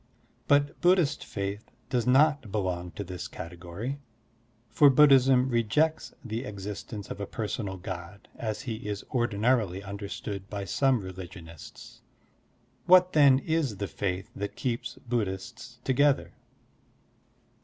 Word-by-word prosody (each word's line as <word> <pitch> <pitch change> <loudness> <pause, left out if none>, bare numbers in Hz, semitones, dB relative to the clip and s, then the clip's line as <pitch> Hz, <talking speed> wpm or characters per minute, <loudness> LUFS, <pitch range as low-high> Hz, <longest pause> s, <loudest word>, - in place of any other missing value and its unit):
But 145 0 +2
Bud 180 +1 +6
dhist 155 -4 0
faith 100 +2 -5 0.2
does 125 -1 0
not 140 -3 +4
belong 90 -4 -2
.to 100 - -5
this 90 -1 -6
category, 90 +10 -6 0.7
for 140 +6 +6
Buddhism 135 -2 +6
rejects 130 +7 +1
the 115 +2 -3
existence 105 -1 -7
of 100 - -6
a 100 - -3
personal 105 -3 -4
God 95 0 -8
as 110 -2 -4
he 110 -4 -5
is 105 -1 -4
ordinarily 110 -4 +1
understood 100 0 -6
by 100 -1 -4
some 130 +4 +2
religionists. 85 -4 -10 0.9
What, 185 0 +6
then, 140 -4 +7
is 155 -10 0
the 100 0 -3
faith 95 -1 -3
that 100 0 -4
keeps 120 -2 -3
Buddhists 115 +2 -3
together? 140 +2 +2
110 Hz, 125 wpm, -28 LUFS, 95-135 Hz, 0.9 s, then